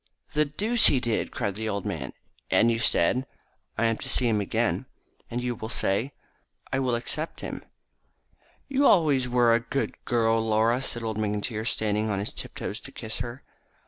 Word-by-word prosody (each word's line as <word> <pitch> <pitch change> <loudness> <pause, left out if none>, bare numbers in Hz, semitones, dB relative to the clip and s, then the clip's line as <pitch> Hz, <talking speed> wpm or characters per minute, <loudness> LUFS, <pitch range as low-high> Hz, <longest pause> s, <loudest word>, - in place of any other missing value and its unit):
"The 150 0 +3
deuce 215 +11 +4
he 135 - +4
did!" 120 -3 -1
cried 100 - -2
the 110 +2 -3
old 100 -2 -3
man. - - -4 0.4
"And 115 - +4
you 115 - 0
said 125 +4 +2 0.2
?" - - -43
"I 115 - +2
am 115 -1 +2
to - - -6
see 125 - +3
him 110 -3 +2
again." 100 - -1 0.4
"And 120 +1 -3
you 125 -1 -1
will 110 -1 -7
say 115 +4 0 0.3
?" - - -20
"I 135 - +2
will 125 -3 +1
accept 150 +7 -4
him." - - -6 1.0
"You 275 -1 0
were 285 - +6
always 145 -8 +4
a 120 -1 +3
good 135 - -2
girl, 115 -2 +2
Laura," 115 +3 +2
said 120 -3 -2
old 110 -1 -2
McIntyre, 105 +1 -2
standing 110 -1 0
on 100 - 0
his 100 +2 -3
tiptoes - - -6
to - - -11
kiss 110 0 -6
her. 120 +3 -5
115 Hz, 190 wpm, -27 LUFS, 110-130 Hz, 1.0 s, were